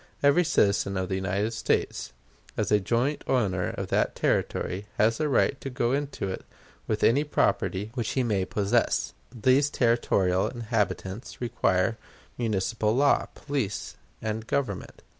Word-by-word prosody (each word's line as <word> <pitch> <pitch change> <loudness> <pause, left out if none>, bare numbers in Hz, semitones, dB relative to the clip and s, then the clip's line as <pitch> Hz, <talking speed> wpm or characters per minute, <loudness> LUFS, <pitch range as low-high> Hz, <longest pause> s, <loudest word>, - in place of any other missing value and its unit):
Every 145 +5 +5
citizen 100 - +2
of 95 0 -2
the 95 - 0
United 100 +4 -1
States, - - -1 0.5
as - - 0
a 105 - +5
joint 120 +8 0
owner 95 -8 +1
of - - -5
that - - +1
Territory, 100 +3 -1
has 115 +2 +3
a 155 - +1
right 140 +1 +2
to 135 - -4
go 120 -2 0
into 140 -6 -2
it 95 - -5 0.4
with 105 -1 -1
any 140 +6 +4
property 105 -7 0
which 120 -4 -2
he 130 - +1
may 100 -5 0
possess. 105 +5 +1 0.2
These 130 +4 +3
territorial 100 -8 +2
inhabitants 110 -2 -3
require 110 -3 +1 0.4
municipal 110 0 0
law, 140 +2 +3
police, 135 -9 -3 0.3
and 110 +1 -3
government. 125 -9 -3
115 Hz, 140 wpm, -27 LUFS, 100-130 Hz, 0.5 s, Every